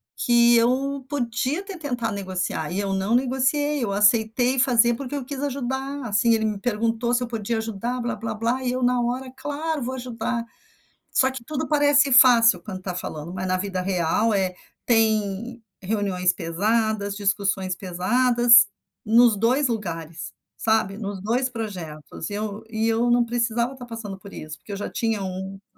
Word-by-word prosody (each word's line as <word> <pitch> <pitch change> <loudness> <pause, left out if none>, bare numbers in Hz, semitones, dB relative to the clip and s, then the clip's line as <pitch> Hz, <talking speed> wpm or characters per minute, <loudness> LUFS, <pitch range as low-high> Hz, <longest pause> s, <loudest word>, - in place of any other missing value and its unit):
que 235 0 +4
eu 260 +3 +1
podia 255 +2 -1
até 390 -2 -8
tentar 245 -8 -3
negociar 185 -3 -3
e 190 - -2
eu 200 -1 -2
não 195 +4 +1
negociei, 265 +3 +1
eu 205 - -1
aceitei 220 +5 +3
fazer 240 -2 +4
porque 275 +3 -6
eu 280 - -3
quis 275 +1 -6
ajudar, 270 0 -3
assim, 220 +2 +3
ele 220 -1 +1
me 215 -1 -1
perguntou 230 +2 -1
se 245 0 +2
eu - - -4
podia 225 -1 -2
ajudar, 230 +3 -3
blá 240 - -2
blá 225 +1 -4
blá 235 +4 -1
e 250 - 0
eu, 255 +1 -2
na 250 0 +2
hora: 250 +2 -2
"Claro 295 +2 -3
vou 255 +2 -3
ajudar.". 240 -2 -3 0.7
Só 260 0 +4
que 260 -2 -8
tudo 300 -1 -3
parece 290 -2 +4
fácil 235 -7 +6
quando 185 0 -7
tá 185 -1 -4
falando, 170 -2 -6
mas 185 0 -4
na 185 - +1
vida 185 -1 -3
real 185 +4 +1
é 190 -2 0 0.3
tem 225 0 +1 0.2
reuniões 185 -3 0
pesadas, 205 +4 -1
discussões 195 -2 0
pesadas, 235 +5 +4 0.4
nos 230 0 +5
2 250 +6 +2
lugares, 165 -7 -5 0.2
sabe? 220 -3 +1
Nos 200 -3 -5
2 240 +6 0
projetos, 180 - -7
e - - -6
eu 210 0 -4
e 220 0 -1
eu 230 +2 +1
não 240 0 +4
precisava 235 +1 -1
tá 245 - -9
passando 225 -5 -7
por 200 0 -12
isso, 155 0 -8
porque 205 - -10
eu - - -3
já 205 - -4
tinha 225 -3 -1
1 190 +1 -5
que - - -39
230 Hz, 175 wpm, -24 LUFS, 200-250 Hz, 0.7 s, fácil